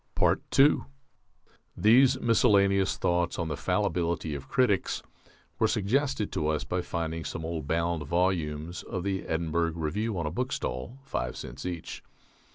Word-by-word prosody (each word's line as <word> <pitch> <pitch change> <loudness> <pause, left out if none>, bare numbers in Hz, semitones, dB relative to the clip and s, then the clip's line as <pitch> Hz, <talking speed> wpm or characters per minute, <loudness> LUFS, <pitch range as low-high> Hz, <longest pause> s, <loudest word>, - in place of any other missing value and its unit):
II 140 +2 +6 1.0
These 125 +7 +5
miscellaneous 100 -4 +3
thoughts 85 0 0
on 85 -2 -2
the 75 - -2
fallibility 85 -1 -1
of 70 -1 -6
critics 125 -8 +1 0.6
were 110 - +4
suggested 115 +2 0
to 75 - -1
us 75 -1 0
by 90 - -2
finding 80 -2 -3
some 80 - -5
old 80 -3 -4
bound 85 -2 0
volumes 85 -2 -1
of 90 -2 -5
the 95 -1 -2
Edinburgh 85 0 0
Review 95 +7 -2
on 85 - -2
a 75 - -2
bookstall, 95 - -3
five 60 - -3
cents 65 +8 -7
each. 85 -2 -6
85 Hz, 140 wpm, -28 LUFS, 80-105 Hz, 1.0 s, II